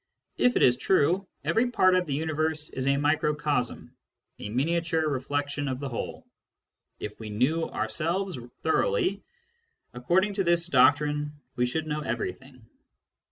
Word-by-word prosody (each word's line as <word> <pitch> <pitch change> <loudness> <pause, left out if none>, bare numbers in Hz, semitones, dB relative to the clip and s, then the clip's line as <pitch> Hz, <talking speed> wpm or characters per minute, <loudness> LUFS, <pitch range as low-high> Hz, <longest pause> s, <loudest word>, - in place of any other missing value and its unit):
If 250 0 +3
it - - +3
is 125 -1 +5
true, 185 +5 +2 0.2
every 240 +2 +2
part 185 -6 +4
of 180 -1 +1
the 140 - -1
universe 155 0 -1
is 130 0 -3
a 140 0 +3
microcosm, 150 -3 0 0.4
a 105 - -6
miniature 160 +6 0
reflection 145 +1 -2
of 130 -1 -3
the 140 -1 -4
whole. 120 - -5 0.7
If 105 0 -7
we 110 -1 -7
knew 135 +10 +1
ourselves 165 - -2 0.2
thoroughly, 400 - +1 0.7
according 175 +12 +1
to 195 -1 0
this 170 -1 +2
doctrine, 150 0 +3 0.2
we 125 0 +1
should 160 +5 -2
know 150 -1 -2
everything. 125 0 -5
150 Hz, 140 wpm, -27 LUFS, 130-170 Hz, 0.7 s, is